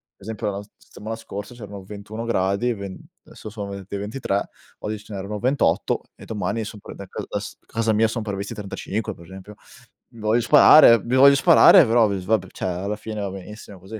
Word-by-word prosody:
Per - - -70
esempio 105 0 -4
la 100 0 -5
s 105 - -16
settimana 110 +3 -8
scorsa 105 -1 -8
c'erano 100 -4 -9
21 105 +3 -8
gradi, 100 +2 0
ven 100 -3 -7 0.3
adesso 110 - -11
son 100 -2 -7
ven 100 -1 -8
ventitré 100 0 -2 0.4
oggi 110 0 -4
ce 105 0 -12
n'erano 100 +2 -5
28 130 +5 0
e - - -13
domani 105 +1 -3
sono 105 -1 -9
prev - - -10
da - - -8
ca - - -5
s - - -9
casa 115 0 -1
mia 110 +1 +3
sono 110 0 -4
previsti 100 +1 -5
35 105 +1 -5
per 85 - -15
esempio. 95 +3 -12 0.5
Mi 115 - -16
voglio 110 +3 +2
sparare, 120 -2 +7
mi 120 +2 -1
voglio 140 +1 +8
sparare 170 +2 +7
però 115 0 +4
v 100 -1 -2
s - - -9
vabbè 100 -3 +1
cioè 95 - -4
alla 95 +4 -3
fine 110 0 -7
va 100 -1 -3
benissimo 100 +1 -10
così. 100 +4 -9
105 Hz, 205 wpm, -22 LUFS, 100-115 Hz, 0.5 s, voglio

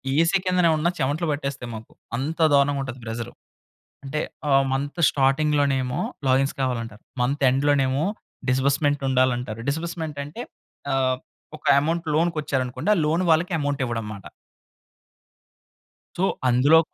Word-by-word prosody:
AC 165 +4 +4
కిందనే 180 -2 +3
ఉన్న 160 +3 +1
చెమటలు 150 +5 0
పట్టేస్తాయి 140 -4 -4
మాకు. 110 0 -10 0.3
అంత 155 +6 -3 0.2
దారుణంగా 140 0 +3
ఉంటది 130 -1 -7
ప్రెషర్. 115 +1 -5 0.7
అంటే 145 +3 -2 0.3
ఆ - - +3 0.2
మంత్ 145 +5 -2
స్టార్టింగ్‌లో 145 +2 +2
నేమో 125 -1 -1 0.3
లాగిన్స్ 135 +1 +2
కావాలంటారు. 115 -4 -3 0.2
మంత్ 140 +3 -1
ఎండ్‌ 135 +3 0
లోనేమో 135 0 +2 0.5
డిస్బర్స్‌మెంట్ 140 +2 +2
ఉండాలంటారు. 125 -3 +1
డిస్బర్స్‌మెంట్ 160 -1 -4
అంటే 160 +12 -7 0.5
ఆహ్, 130 -1 +2 0.4
ఒక - - -35 0.2
అమౌంట్ 165 +2 -1
లోన్‌కి 165 +1 +1
వచ్చారనుకోండి, 135 +6 -2
ఆ - - -1
లోన్ 165 +4 +1
వాళ్ళకి 170 +4 +3
అమౌంట్ 145 -1 -1
ఇవ్వడంమాట. 110 -4 -5 1.9
సో, 180 - -1 0.3
అందులో 140 +7 +6
140 Hz, 130 wpm, -24 LUFS, 130-155 Hz, 1.9 s, అందులో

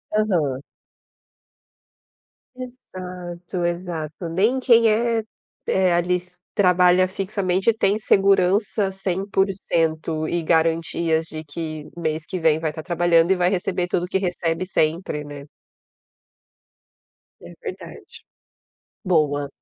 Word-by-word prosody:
Aham. 165 -11 +1 1.9
Exato, 180 -8 -7
exato. 170 -2 -4
Nem 210 +10 +2
quem 235 -3 +5
é, 230 +1 +1 0.4
eh, 185 -2 +2
ali 175 +1 +2
s 180 0 -7 0.2
trabalha 180 -1 +4
fixamente 190 +1 0
tem 210 -1 +1
segurança 195 0 +2
100% 185 -5 -1
e 175 - -1
garantias 165 0 +1
de 155 0 -7
que 155 0 -6
mês 155 -2 -3
que 185 - -4
vem 160 -2 +3
vai 160 -1 -2
estar 160 - -7
trabalhando 170 0 +2
e - - +5
vai 180 -1 +2
receber 185 -1 -1
tudo 175 0 -1
o - - -9
que 190 - 0
recebe 175 -2 -2
sempre, 160 -3 -1
né? 145 -1 -10 1.9
É - - -11
verdade, - - -8 1.0
boa. 150 -5 +1
180 Hz, 110 wpm, -22 LUFS, 160-190 Hz, 1.9 s, quem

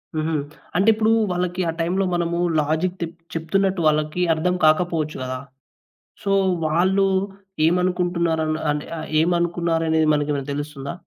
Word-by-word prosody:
హుహు. 155 +1 -1 0.4
అంటే 195 +4 +4
ఇప్పుడు 220 +1 +2 0.2
వాళ్ళకి 180 +1 -1
ఆ - - +1
టైంలో 180 +4 +1
మనము 170 0 0 0.2
లాజిక్ 160 +5 0
తె - - +1 0.3
చెప్తున్నట్టు 185 +3 0
వాళ్ళకి 155 +3 +1
అర్థం 180 +3 0
కాకపోవచ్చు 155 -1 +2
గదా! 130 0 -3 0.9
సో, 200 - 0 0.3
వాళ్ళు 185 +5 +2 0.6
ఏమనుకుంటున్నారు 175 -1 +1
అన్ 155 - 0 0.2
అన్ 145 0 -2 0.4
ఏమనుకున్నారనేది 165 -2 +1
మనకేమైనా 145 -2 -1
తెలుస్తుందా? 145 0 -5
170 Hz, 120 wpm, -22 LUFS, 155-180 Hz, 0.9 s, అంటే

